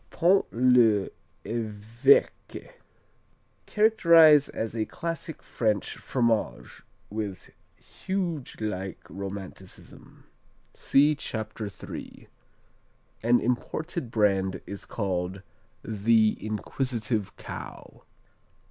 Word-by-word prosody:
Pont 180 +3 +3
l'Evêque 115 -5 +4 2.6
Characterized 170 -9 +6
as 110 0 -4
a 110 -1 -1
classic 165 -2 -5
French 105 -4 -1
fromage 115 -4 -1 0.3
"with 105 -3 -5 0.2
Huge 175 -8 -4
like 95 -4 -4
Romanticism." 95 -1 -9 0.5
(See 145 +3 +3
Chapter 110 -6 -5
3.) 95 - -10 0.9
An 120 +2 +4
imported 130 +4 -3
brand 100 -4 +1
is 100 - -8
called 95 -2 -3 0.4
"The 110 0 +2
Inquisitive 110 -1 -3
Cow." - - -9
110 Hz, 75 wpm, -27 LUFS, 100-140 Hz, 2.6 s, Characterized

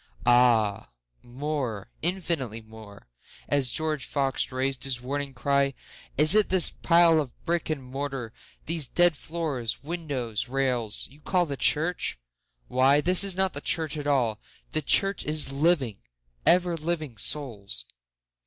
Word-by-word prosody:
Ah 120 -4 +4 0.3
more—infinitely 135 - -3
more;(As 110 - -5
George 155 +1 -2
Fox 135 -2 -1
rais'd 130 +1 -1
his 135 -3 -2
warning 140 +3 -3
cry, 140 -1 +1 0.4
"Is 155 +5 +4
it 215 -1 +4
this 185 -2 +2
pile 170 -2 +5
of 135 -4 -9
brick 170 -1 0
and 150 -4 -2
mortar—these 135 +3 -5
dead 175 +2 +3
floors, 145 -8 -3
windows, 140 -9 -3
rails—you 130 0 -1
call 180 +2 +2
the 140 -3 -4
church? 160 - 0 0.5
Why 130 +3 +4
this 180 +5 +1
is 195 -2 -2
not 190 0 +1
the 145 - -3
church 160 -1 -2
at 145 -1 -4
all—the 130 +2 -1
Church 195 +7 +1
is 150 -2 -2
living, 140 - +2 0.5
ever 175 -1 +4
living 155 -5 -3
Souls.") 100 - -1
140 Hz, 125 wpm, -27 LUFS, 125-160 Hz, 0.5 s, pile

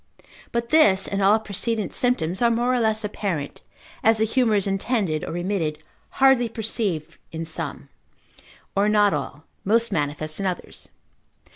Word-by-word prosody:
But 235 0 -2
this, 200 -12 +4
and 200 0 -2
all 200 +3 +5
precedent 215 -1 -3
symptoms, 190 -7 0
are 235 - +5
more 240 +2 +1
or 250 - +2
less 220 -1 +1
apparent, 190 -8 -4 0.4
as 225 0 +5
the 220 - +2
humour 230 -1 +2
is 200 - +2
intended 195 -5 -1
or - - -5
remitted, 175 -3 -2 0.4
hardly 265 -3 +4
perceived 200 -8 -3
in 165 +1 -5
some, 160 - -5 0.9
or 200 +2 +3
not 210 -1 +4
all, 150 +3 -4 0.2
most 230 +3 +2
manifest 155 -2 -2
in 195 - -1
others. 180 -2 -6
205 Hz, 150 wpm, -23 LUFS, 175-230 Hz, 0.9 s, all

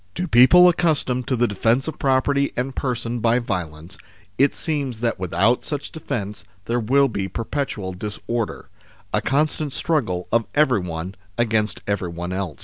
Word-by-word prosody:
To 180 +1 -2
people 155 +7 +7
accustomed 155 -8 +1
to 130 - +1
the 120 0 +2
defence 115 +7 +1
of 160 - -5
property 140 +1 +2
and 130 +2 -2
person 120 -2 -2
by 115 +1 +3
violence, 90 -7 -5 0.4
it 140 +1 +4
seems 140 -7 -2
that 115 -5 0
without 95 +6 +1
such 145 -1 -5
defence 105 - -5 0.2
there 120 +1 0
will 135 +5 +3
be 100 -6 -3
perpetual 115 -4 -3
disorder, 105 +4 -4 0.4
a - - +2
constant 150 0 0
struggle 115 - -1
of 115 0 +2
everyone 95 - +1 0.2
against 110 -3 0
everyone 90 -3 -3
else. 95 -5 -3
120 Hz, 145 wpm, -22 LUFS, 100-140 Hz, 0.4 s, people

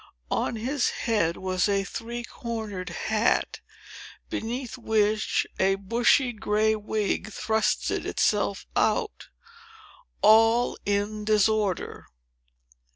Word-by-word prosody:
On - - 0
his 250 +4 0 0.2
head 205 -9 +1
was 185 +1 0
a 200 -1 +1
three 235 +4 -6
cornered 220 -6 -5
hat, 215 +5 0 0.7
beneath 240 +2 -4
which 215 -3 +1
a 195 +1 +3
bushy 240 +6 +2
gray 215 0 +1
wig 215 0 -2
thrust 220 +1 0
itself 205 -2 0
out, 445 -4 0 1.0
all 225 +3 +5
in 205 +1 -1
disorder. 215 -2 0
215 Hz, 95 wpm, -26 LUFS, 205-230 Hz, 1.0 s, all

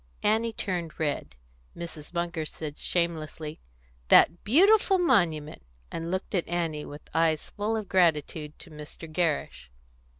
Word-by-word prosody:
Annie 225 +2 +2
turned 180 -7 -4
red; 145 - -2 0.4
Mrs. 170 -3 -8
Munger 170 -2 -2
said 150 -1 -7
shamelessly, 160 -3 -2 0.5
"That 170 - +6
beautiful 390 - +5
monument!" 175 - +2 0.3
and 165 +1 -4
looked 185 +3 -3
at 180 -4 0
Annie 165 -3 -2
with 145 +1 -10
eyes 160 -1 +1
full 215 +2 -1
of 215 -3 -4
gratitude 155 -4 +1
to 165 - -13
Mr. 150 +2 -9
Gerrish. 155 - -1
170 Hz, 130 wpm, -28 LUFS, 155-190 Hz, 0.5 s, That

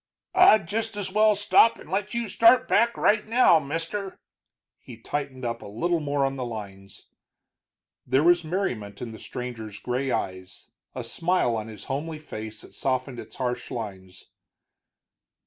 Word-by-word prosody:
"I'd 215 - +6
just 220 +1 -3
as 190 -2 -3
well 215 0 +5
stop 205 +3 +4
and - - -13
let 200 +5 -2
you 235 -1 -1
start 230 +5 +5
back 235 +2 +3
right 210 0 +3
now, 225 -7 +5
mister." 165 +7 -4 0.6
He 120 - -12
tightened 135 +1 -4
up 115 0 -3
a - - -9
little 170 +12 0
more 145 -2 0
on 135 0 -2
the 130 - -3
lines. 100 -4 -8 1.0
There 130 +3 +3
was 175 +1 +5
merriment 125 - -3
in 120 - -6
the 110 - -10
stranger's 115 -4 -7
gray 125 +5 -2
eyes, 95 -5 -4 0.2
a - - -4
smile 170 -8 0
on 110 -1 -4
his 110 -3 -9
homely 155 +4 -4
face 110 -8 -8
that - - -15
softened 130 -1 -2
its - - -10
harsh 125 -1 -3
lines. 95 -5 -7
140 Hz, 160 wpm, -26 LUFS, -, 1.0 s, I'd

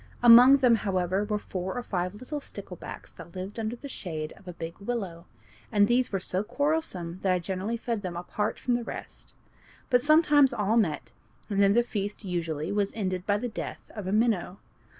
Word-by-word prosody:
Among 245 +3 +9
them, 250 -3 +4
however, 190 -1 0
were 210 0 -1
four 185 -2 -5
or 245 - -3
five 180 -3 -2
little 255 +7 -5
sticklebacks - - -9
that 170 - -13
lived 190 +4 -6
under 225 +1 -2
the 280 - -9
shade 160 - -5
of 190 - -19
a 180 - -6
big 165 0 -7
willow, 195 -6 -4 0.4
and 205 0 +4
these 245 +2 +2
were 195 - 0
so 185 +1 -2
quarrelsome 240 - -1
that 190 - +2
I 180 - +3
generally 190 +6 -3
fed 230 -2 -3
them 180 -3 -5
apart 205 +4 -2
from 245 - -1
the 240 0 0
rest. - - -9 0.6
But 245 -1 +5
sometimes 295 -2 +5
all 210 -1 +1
met, 155 - 0 0.4
and 200 0 +2
then 200 0 +5
the 240 +2 +4
feast 205 -2 -4
usually 165 -4 -2
was 200 -1 0
ended 185 -4 -2
by 205 0 +3
the 245 +4 -3
death 230 - -7
of 210 -4 -6
a - - -1
minnow. 210 -4 +1
205 Hz, 195 wpm, -28 LUFS, 185-240 Hz, 0.6 s, Among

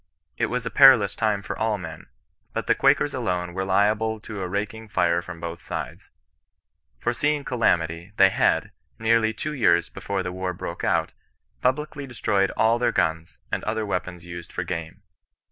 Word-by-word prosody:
It - - 0
was 125 -1 -3
a - - -3
perilous 130 -8 +7
time 105 -3 0
for - - -4
all 110 -1 0
men; 80 -4 -9 0.5
but - - -2
the - - +4
Quakers - - +3
alone 90 -1 -2
were 95 +1 -2
liable 105 +3 +1
to 105 -2 -7
a 90 - -2
raking 105 +4 -4
fire 85 -4 +1
from 85 -1 -9
both 85 0 -6
sides. - - -6 0.9
Foreseeing 145 - 0
cala 120 -8 +3
mity, 85 +3 -7
they 95 0 +7
had, - - +1 0.3
nearly 110 0 +3
two 150 +7 -4
years 85 - +3
before 100 -1 -3
the 90 - -4
war 95 0 -3
broke - - -6
out, - - +1 0.5
publicly 145 +2 -1
destroyed 100 -6 +1
all 115 +2 +3
their 120 - +2
guns, 80 +1 -1
and - - -2
other 110 0 -1
weapons 90 -3 -4
used 85 -1 -8
for 90 - -3
game. 85 -2 -6
100 Hz, 175 wpm, -24 LUFS, 85-110 Hz, 0.9 s, perilous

